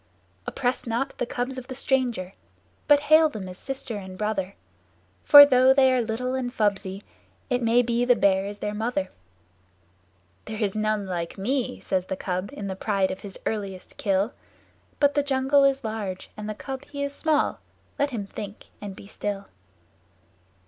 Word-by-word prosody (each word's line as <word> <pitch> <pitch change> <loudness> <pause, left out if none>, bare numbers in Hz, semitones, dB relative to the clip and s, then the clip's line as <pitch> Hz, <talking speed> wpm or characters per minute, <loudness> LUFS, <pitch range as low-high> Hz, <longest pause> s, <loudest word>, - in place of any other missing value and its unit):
Oppress 250 -1 -1
not 240 +5 -1
the 245 - -1
cubs 255 +2 -3
of 250 - -12
the 260 - -6
stranger, 245 -8 0 0.5
but 290 -1 +6
hail 310 +2 +6
them 210 -9 -7
as 185 0 -9
Sister 265 -4 -5
and 190 -2 -8
Brother, 200 -2 -2 0.7
For 290 -1 +11
though 260 -1 +5
they 265 -1 +5
are 255 - +2
little 235 +3 -2
and 255 -2 -2
fubsy, 200 -4 -1 0.5
it 250 0 +1
may 235 +1 +4
be 240 0 0
the 245 0 +5
Bear 195 -2 +2
is 205 0 -6
their 210 0 -3
mother. 210 -3 -2 1.3
"There 220 -1 -6
is 205 -4 0
none 215 -1 0
like 175 -3 -4
to 195 - -9
me!" 255 +4 -1
says 185 -1 -1
the 190 - -3
Cub 185 +1 -3
in 205 - -6
the 190 -1 -3
pride 195 -1 0
of 185 - -6
his 195 -2 -9
earliest 200 -4 -4
kill; 205 -2 0 0.7
But 285 -1 +4
the 290 - +2
jungle 275 0 +3
is 275 -1 +2
large 215 -4 -5
and 210 0 -6
the 215 - -4
Cub 265 +3 -6
he 285 -1 -5
is 280 0 -3
small. 310 0 +1 0.4
Let 285 - +2
him 225 -6 -4
think 200 +1 -9
and 200 -2 -6
be - - -12
still. 200 -1 -4
225 Hz, 180 wpm, -25 LUFS, 200-265 Hz, 1.3 s, For